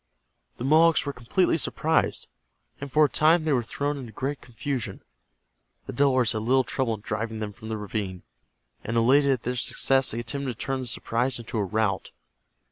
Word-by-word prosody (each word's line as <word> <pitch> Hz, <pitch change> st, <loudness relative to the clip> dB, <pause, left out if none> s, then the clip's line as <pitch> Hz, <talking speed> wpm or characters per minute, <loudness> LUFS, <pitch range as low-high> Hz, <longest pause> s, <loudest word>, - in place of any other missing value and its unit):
The 120 Hz, -, -4 dB
Mohawks 160 Hz, +3 st, +5 dB
were 140 Hz, -, -3 dB
completely 160 Hz, +9 st, +1 dB
surprised, 160 Hz, +2 st, 0 dB, 0.5 s
and 140 Hz, -1 st, -7 dB
for 155 Hz, +2 st, +5 dB
a -, -, +3 dB
time 155 Hz, +3 st, +3 dB
they 155 Hz, -2 st, +1 dB
were 125 Hz, -, +2 dB
thrown 145 Hz, +5 st, -3 dB
into 120 Hz, -4 st, -8 dB
great 140 Hz, +3 st, -4 dB
confusion. 125 Hz, -4 st, -5 dB, 0.8 s
The -, -, -6 dB
Delawares 130 Hz, -3 st, +3 dB
had 110 Hz, -, -2 dB
little 130 Hz, +4 st, +3 dB
trouble 125 Hz, -3 st, -1 dB
in 105 Hz, -, -13 dB
driving 110 Hz, +2 st, -3 dB
them 105 Hz, -1 st, -4 dB
from 110 Hz, +2 st, -10 dB
the 110 Hz, -, -2 dB
ravine, 100 Hz, -3 st, -4 dB, 0.6 s
and 115 Hz, +1 st, -2 dB
elated 135 Hz, +5 st, +4 dB
at 130 Hz, -4 st, +1 dB
their 125 Hz, +1 st, -2 dB
success 135 Hz, +2 st, +2 dB
they 115 Hz, -, -1 dB
attempted 130 Hz, +2 st, -3 dB
to -, -, -21 dB
turn 135 Hz, +2 st, -2 dB
the 130 Hz, -, -5 dB
surprise 120 Hz, +3 st, -1 dB
into 115 Hz, -1 st, -4 dB
a -, -, +1 dB
rout. 100 Hz, 0 st, -1 dB
125 Hz, 190 wpm, -26 LUFS, 110-140 Hz, 0.8 s, Mohawks